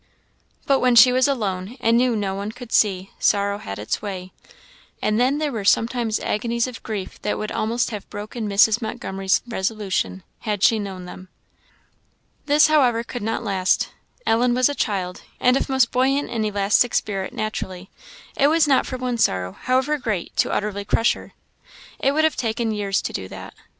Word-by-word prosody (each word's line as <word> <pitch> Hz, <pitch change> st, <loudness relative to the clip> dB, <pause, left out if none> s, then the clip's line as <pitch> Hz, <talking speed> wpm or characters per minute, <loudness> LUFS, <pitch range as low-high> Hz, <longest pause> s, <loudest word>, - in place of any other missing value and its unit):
But 275 Hz, -1 st, +3 dB
when 250 Hz, -1 st, +3 dB
she 250 Hz, +2 st, +9 dB
was 255 Hz, +2 st, +3 dB
alone, 210 Hz, -4 st, -2 dB
and 230 Hz, +1 st, +3 dB
knew 245 Hz, 0 st, +3 dB
no 200 Hz, -2 st, -1 dB
one 200 Hz, +2 st, -4 dB
could 245 Hz, 0 st, -11 dB
see, 195 Hz, -2 st, +2 dB
sorrow 200 Hz, 0 st, +1 dB
had 100 Hz, -, -6 dB
its 105 Hz, +1 st, -3 dB
way; 185 Hz, -3 st, -6 dB, 0.7 s
and 215 Hz, +1 st, 0 dB
then 260 Hz, +4 st, +2 dB
there 300 Hz, -1 st, -1 dB
were 220 Hz, -5 st, -4 dB
sometimes 230 Hz, +2 st, +1 dB
agonies 235 Hz, +2 st, -1 dB
of 250 Hz, -3 st, -8 dB
grief 210 Hz, -4 st, -6 dB
that 210 Hz, -, -1 dB
would 215 Hz, -, -4 dB
almost 230 Hz, +3 st, -1 dB
have 210 Hz, -3 st, -7 dB
broken 210 Hz, +1 st, -5 dB
Mrs. 210 Hz, +3 st, +4 dB
Montgomery's 195 Hz, -4 st, -1 dB
resolution, 190 Hz, -, -2 dB, 0.2 s
had 210 Hz, -3 st, -3 dB
she 225 Hz, -, +5 dB
known 190 Hz, -3 st, -6 dB
them. 185 Hz, +1 st, -11 dB, 1.2 s
This, 295 Hz, +1 st, +6 dB
however, 260 Hz, -7 st, +3 dB
could 245 Hz, 0 st, -6 dB
not 225 Hz, +3 st, -2 dB
last. 190 Hz, -3 st, +1 dB, 0.4 s
Ellen 240 Hz, +2 st, +2 dB
was 255 Hz, +2 st, +3 dB
a -, -, -1 dB
child, 185 Hz, -8 st, -2 dB, 0.2 s
and 250 Hz, +1 st, +4 dB
of 275 Hz, -, -1 dB
most 265 Hz, -3 st, +3 dB
buoyant 270 Hz, +3 st, +1 dB
and 225 Hz, -2 st, -1 dB
elastic 205 Hz, +3 st, +2 dB
spirit 195 Hz, -2 st, -1 dB
naturally; 190 Hz, -4 st, -5 dB, 0.4 s
it 280 Hz, -, +4 dB
was 315 Hz, 0 st, +3 dB
not 270 Hz, -2 st, +3 dB
for 255 Hz, -, -4 dB
one 250 Hz, -2 st, -2 dB
sorrow, 90 Hz, -, +1 dB
however 260 Hz, -, 0 dB
great, 215 Hz, -8 st, -3 dB
to -, -, +2 dB
utterly 205 Hz, -1 st, -2 dB
crush 225 Hz, +3 st, +2 dB
her. -, -, -12 dB, 0.7 s
It 275 Hz, -, +2 dB
would 310 Hz, +2 st, +2 dB
have 315 Hz, -, +2 dB
taken 225 Hz, -1 st, -1 dB
years 200 Hz, -2 st, -1 dB
to -, -, -4 dB
do 95 Hz, -, -4 dB
that. -, -, -9 dB
220 Hz, 180 wpm, -22 LUFS, 200-250 Hz, 1.2 s, she